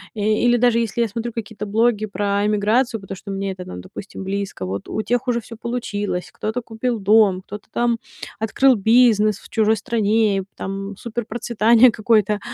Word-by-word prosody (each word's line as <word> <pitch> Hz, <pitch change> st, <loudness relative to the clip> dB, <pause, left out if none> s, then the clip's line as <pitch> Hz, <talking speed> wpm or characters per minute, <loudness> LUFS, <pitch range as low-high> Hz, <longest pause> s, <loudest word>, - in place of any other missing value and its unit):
Э, -, -, -6 dB
или 215 Hz, +3 st, +3 dB
даже 240 Hz, -1 st, +3 dB
если 230 Hz, 0 st, -2 dB
я 230 Hz, -, +2 dB
смотрю 235 Hz, +1 st, -3 dB
какие-то 220 Hz, -2 st, -6 dB
блоги 215 Hz, 0 st, +1 dB
про 200 Hz, 0 st, -1 dB
эмиграцию, 220 Hz, +3 st, +1 dB
потому 195 Hz, 0 st, -7 dB
что 200 Hz, -, -11 dB
мне 195 Hz, 0 st, -2 dB
это 185 Hz, -1 st, -8 dB
нам, 90 Hz, 0 st, -8 dB
допустим, 195 Hz, -, -9 dB
близко, 195 Hz, -, -4 dB
вот 95 Hz, +2 st, -5 dB
у -, -, -3 dB
тех 245 Hz, +3 st, -1 dB
уже 235 Hz, -1 st, +1 dB
всё 230 Hz, +1 st, -11 dB
получилось. 210 Hz, -6 st, -3 dB
Кто-то 220 Hz, +3 st, -3 dB
купил 230 Hz, +1 st, -3 dB
дом, 200 Hz, -2 st, +4 dB
кто-то 210 Hz, +2 st, -9 dB
там 235 Hz, -1 st, 0 dB, 0.4 s
открыл 255 Hz, +5 st, +3 dB
бизнес 215 Hz, -1 st, +4 dB
в -, -, -15 dB
чужой 220 Hz, -1 st, +2 dB
стране, 215 Hz, -3 st, +1 dB
там 195 Hz, +1 st, -5 dB
суперпроцветание 235 Hz, +1 st, +2 dB
какое-то, 215 Hz, -2 st, +2 dB
215 Hz, 170 wpm, -21 LUFS, 200-235 Hz, 0.4 s, дом